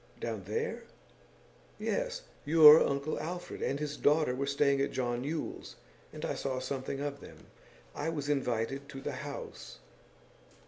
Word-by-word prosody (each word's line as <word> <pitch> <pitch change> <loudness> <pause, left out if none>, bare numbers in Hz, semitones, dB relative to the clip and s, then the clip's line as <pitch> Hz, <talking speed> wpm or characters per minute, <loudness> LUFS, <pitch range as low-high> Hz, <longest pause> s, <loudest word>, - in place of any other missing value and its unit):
'Down - - -4
there?' 460 +1 -3 0.9
'Yes. - - -2 0.2
Your 155 0 +9
uncle 140 +3 -1
Alfred 175 +3 -5
and 140 - -1
his 150 -1 -3
daughter 150 -3 +3
were 135 +2 -2
staying 140 0 +2
at 140 - +1
John 120 -1 -1
Yule's, 155 +2 -4 0.4
and - - -6
I - - -1
saw 130 -2 -3
something 130 +1 -3
of 145 -1 -3
them. - - -13 0.5
I 160 - -2
was 145 -3 -3
invited 135 0 -1
to 135 -2 -7
the 145 - -3
house. 140 - -7
140 Hz, 145 wpm, -31 LUFS, 135-155 Hz, 0.9 s, Your